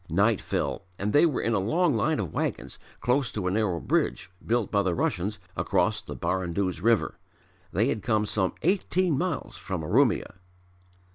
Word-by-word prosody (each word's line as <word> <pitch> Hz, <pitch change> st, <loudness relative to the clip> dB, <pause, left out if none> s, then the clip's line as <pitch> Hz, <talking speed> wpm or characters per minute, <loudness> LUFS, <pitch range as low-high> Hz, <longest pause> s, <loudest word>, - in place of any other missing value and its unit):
Night 100 Hz, +6 st, +3 dB
fell 100 Hz, -, -2 dB
and 105 Hz, +2 st, -2 dB
they 150 Hz, +4 st, +6 dB
were 150 Hz, -, -1 dB
in 115 Hz, -, +1 dB
a 105 Hz, -, +2 dB
long 155 Hz, -, +2 dB
line 145 Hz, +5 st, +1 dB
of 95 Hz, -7 st, -3 dB
wagons -, -, -3 dB, 0.2 s
close 125 Hz, 0 st, +1 dB
to 105 Hz, -3 st, -4 dB
a 90 Hz, -, +1 dB
narrow 100 Hz, -4 st, 0 dB
bridge 85 Hz, +2 st, 0 dB
built 115 Hz, -2 st, 0 dB
by 100 Hz, -, +3 dB
the 95 Hz, -3 st, 0 dB
Russians 100 Hz, +4 st, -1 dB, 0.2 s
across -, -, +1 dB
the -, -, -8 dB
Baranduz 90 Hz, -1 st, -1 dB
river. 115 Hz, +2 st, +2 dB, 0.5 s
They 105 Hz, +6 st, +2 dB
had 120 Hz, -5 st, -1 dB
come 110 Hz, -2 st, +1 dB
some 100 Hz, -3 st, 0 dB
eighteen 185 Hz, -2 st, +2 dB
miles 180 Hz, +6 st, -2 dB
from 95 Hz, -5 st, -4 dB
Urumia. 75 Hz, -, +2 dB
105 Hz, 170 wpm, -27 LUFS, 95-125 Hz, 0.5 s, they